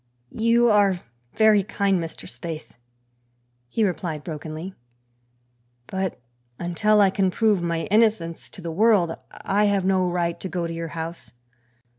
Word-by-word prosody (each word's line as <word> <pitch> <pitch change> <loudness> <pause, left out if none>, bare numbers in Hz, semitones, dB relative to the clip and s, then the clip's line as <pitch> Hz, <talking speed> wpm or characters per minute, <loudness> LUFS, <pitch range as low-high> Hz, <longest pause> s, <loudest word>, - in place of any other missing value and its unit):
"You 230 +1 +3
are 200 -4 +3 0.3
very 220 -2 +5
kind, 195 -1 0
Mr. 165 - -8
Spaythe," 155 +6 -7 1.0
he 220 - 0
replied 175 -5 -3
brokenly, 160 +3 -6 1.1
"but 190 +2 -3 0.4
until 210 +5 +2
I 195 -2 +5
can 195 -1 +1
prove 210 -1 +2
my 170 -1 -1
innocence 210 -7 +2
to 185 - -12
the 165 - -3
world 195 -3 +3 0.2
I 205 +2 0
have 200 -2 +1
no 185 -1 +2
right 170 -1 -1
to 190 - -5
go 175 -1 -2
to 165 - -4
your 165 0 -4
house. 165 -2 -6
185 Hz, 140 wpm, -24 LUFS, 170-205 Hz, 1.1 s, very